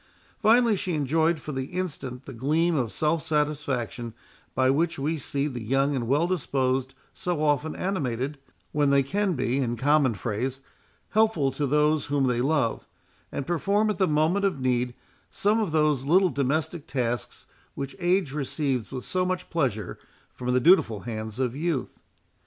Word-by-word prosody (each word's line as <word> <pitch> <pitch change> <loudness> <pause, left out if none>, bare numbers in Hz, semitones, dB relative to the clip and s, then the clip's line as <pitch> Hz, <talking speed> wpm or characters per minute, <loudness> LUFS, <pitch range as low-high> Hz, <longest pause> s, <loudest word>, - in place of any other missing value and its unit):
Finally, 230 0 +5
she 180 -3 -2
enjoyed 160 +3 +2
for 150 - -6
the 135 -2 -3
instant 140 -8 -5
the 135 - -8
gleam 155 +8 +1
of 120 -6 0
self 155 +1 +1
satisfaction 140 -6 -2 0.4
by 130 0 +3
which 160 +5 +1
we 150 +4 -1
see 140 -1 -2
the 125 -5 -4
young 135 +5 +1
and 120 -3 -2
well 145 +6 +3
disposed 135 -6 -1 0.2
so 175 -3 -2
often 150 +1 +1
animated, 140 - -2 0.3
when 145 -1 +2
they 140 0 +4
can 195 +7 0
be, 130 -1 0
in 120 -3 0
common 140 -1 +3
phrase, 120 +7 -3 0.5
helpful 215 -11 +2
to 145 +1 -2
those 150 +1 +2
whom 140 -1 +1
they 120 -2 +1
love, 135 -4 0 0.4
and 140 - -3
perform 200 +6 +1
at 200 - -5
the 190 - +4
moment 155 +6 +2
of 195 -8 +1
need 125 -1 0 0.3
some 210 +3 +1
of 210 -7 -1
those 150 -4 +2
little 180 +6 +4
domestic 150 +4 -1
tasks, 120 -3 -3 0.3
which 140 0 -5
age 175 -4 +1
receives 140 -4 -2
with 130 -2 -6
so 185 0 0
much 185 0 -3
pleasure 120 - -1 0.3
from 125 0 -3
the 125 - +3
dutiful 120 - +4
hands 110 -1 -5
of 130 -2 -1
youth. 155 -3 -2
145 Hz, 165 wpm, -26 LUFS, 130-165 Hz, 0.5 s, Finally